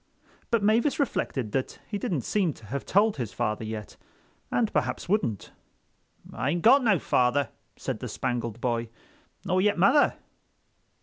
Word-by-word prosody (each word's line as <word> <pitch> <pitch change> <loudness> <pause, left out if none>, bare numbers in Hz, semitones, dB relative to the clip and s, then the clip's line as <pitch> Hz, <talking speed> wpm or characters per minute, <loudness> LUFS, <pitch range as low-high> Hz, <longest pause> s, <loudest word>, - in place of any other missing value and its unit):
But 230 -3 +1
Mavis 230 +8 +2
reflected 130 - -1
that 130 +3 -2
he 205 - -3
didn't 165 -7 -1
seem 190 -7 +1
to 115 - -16
have 135 +6 -5
told 205 +2 +3
his 120 -5 -4
father 110 -2 -1
yet, 110 -2 -6 0.5
and 225 -3 0
perhaps - - -1
wouldn't. 145 - -1 0.8
"Ain't 145 +9 -1
got 260 +4 +7
no 215 -5 +4
father," 125 -1 +1 0.3
said - - -4
the - - -5
Spangled 120 -2 -3
Boy, 120 -2 -1 0.6
"nor 185 +1 +2
yet 205 0 +2
mother." 225 - +4
145 Hz, 145 wpm, -27 LUFS, -, 0.8 s, got